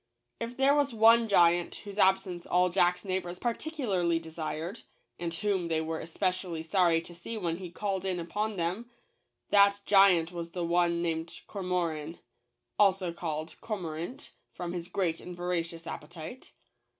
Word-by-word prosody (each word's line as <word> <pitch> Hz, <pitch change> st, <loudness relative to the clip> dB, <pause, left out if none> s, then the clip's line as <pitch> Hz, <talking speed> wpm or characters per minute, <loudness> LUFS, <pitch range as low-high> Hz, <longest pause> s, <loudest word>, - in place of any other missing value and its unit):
If 235 Hz, +1 st, -5 dB
there 270 Hz, +1 st, +5 dB
was 285 Hz, -4 st, +1 dB
one 225 Hz, +1 st, +6 dB
giant 175 Hz, -3 st, +4 dB
whose 200 Hz, 0 st, -7 dB
absence 190 Hz, -2 st, +2 dB
all 180 Hz, 0 st, +3 dB
Jack's 180 Hz, 0 st, +2 dB
neighbors 185 Hz, -2 st, -2 dB
particularly 230 Hz, -, 0 dB
de 165 Hz, -1 st, -8 dB
sired, 160 Hz, +2 st, -4 dB, 0.4 s
and 170 Hz, -1 st, -2 dB
whom 190 Hz, 0 st, -1 dB
they 160 Hz, -1 st, +1 dB
were 160 Hz, 0 st, -3 dB
especially 180 Hz, -1 st, -2 dB
sorry 170 Hz, -1 st, +3 dB
to 175 Hz, -, -11 dB
see 175 Hz, +7 st, -6 dB
when 170 Hz, -5 st, -1 dB
he 185 Hz, -1 st, -7 dB
called 190 Hz, +1 st, -2 dB
in 185 Hz, -2 st, -1 dB
upon 210 Hz, +6 st, -2 dB
them, 185 Hz, +7 st, -2 dB, 0.6 s
that 200 Hz, 0 st, +6 dB
giant 190 Hz, -4 st, +5 dB
was 170 Hz, -1 st, -6 dB
the 175 Hz, -2 st, -2 dB
one 170 Hz, 0 st, +2 dB
named 165 Hz, 0 st, -3 dB
Cormoran 170 Hz, -5 st, -2 dB, 0.6 s
(also 190 Hz, -4 st, +3 dB
called 160 Hz, -2 st, -4 dB
Cormorant 180 Hz, -1 st, -5 dB, 0.2 s
from 175 Hz, -1 st, -5 dB
his 175 Hz, -1 st, -4 dB
great 175 Hz, -3 st, -1 dB
and 180 Hz, -1 st, -8 dB
voracious 170 Hz, -2 st, -3 dB
appetite.) 170 Hz, -, -8 dB
180 Hz, 150 wpm, -30 LUFS, 170-200 Hz, 0.6 s, one